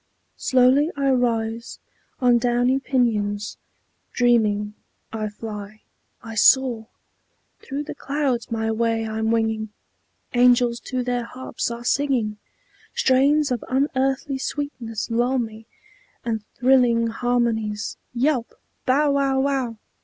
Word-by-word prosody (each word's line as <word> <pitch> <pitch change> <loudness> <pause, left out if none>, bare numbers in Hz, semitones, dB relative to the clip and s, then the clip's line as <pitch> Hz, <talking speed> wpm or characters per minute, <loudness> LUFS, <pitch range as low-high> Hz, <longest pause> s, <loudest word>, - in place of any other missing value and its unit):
slowly 260 +4 +4
I 275 -1 +2
rise 230 -2 -1 0.4
On 245 -1 +5
downy 245 +2 +2
pinions; 210 -6 0 0.6
dreaming, 215 -4 +2 0.4
I 215 -1 -2
fly, 210 0 -8 0.4
I 225 - -7
soar; 235 0 +4 0.7
Through 285 +1 -5
the 295 - -6
clouds 275 -4 -2
my 225 -1 -1
way 225 0 0
I'm 220 0 -1
winging, 220 -1 0 0.6
Angels 245 -1 +4
to 255 -1 -2
their 245 -1 -1
harps 255 0 -4
are 235 0 -6
singing, 245 -7 0 0.6
Strains 280 +2 +3
of 245 - -1
unearthly 270 0 0
sweetness 245 -7 -4
lull 245 +3 +1
me, 225 -2 -5 0.6
And 225 -2 -1
thrilling 245 -2 +4
harmonies 230 -3 -1
"Yelp! 250 -1 0 0.3
Bow 285 +3 +3
wow 275 -1 +1
wow!" 265 -4 0
240 Hz, 110 wpm, -23 LUFS, 225-265 Hz, 0.7 s, On